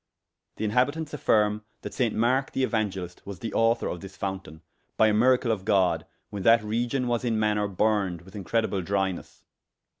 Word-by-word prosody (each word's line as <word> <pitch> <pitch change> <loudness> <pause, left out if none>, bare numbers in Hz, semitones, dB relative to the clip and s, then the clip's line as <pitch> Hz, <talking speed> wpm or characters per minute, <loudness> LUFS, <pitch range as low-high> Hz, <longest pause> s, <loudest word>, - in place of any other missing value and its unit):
The 110 - -3
inhabitantes 145 +8 0
affyrme 105 -6 +2 0.2
that - - -6
Sainct 120 -4 0
Marke 130 +4 +1
the 135 - +1
Euangelist 95 -7 -3
was 100 -1 -7
the 115 - -5
aucthour 115 +1 +1
of 85 - -9
this 95 0 -11
fountayne, 95 -5 -5 0.4
by 110 - +5
a - - +2
miracle 125 +2 +3
of 105 -4 -2
God, 95 -3 +2 0.2
when 100 - -5
that 115 +2 +5
region 120 +4 -1
was 120 0 0
in 115 -3 0
maner 105 -1 +1
burned 100 -3 0
with 95 +2 -15
incredible 105 0 -1
drynesse. 95 0 -3
105 Hz, 175 wpm, -26 LUFS, 95-115 Hz, 0.4 s, by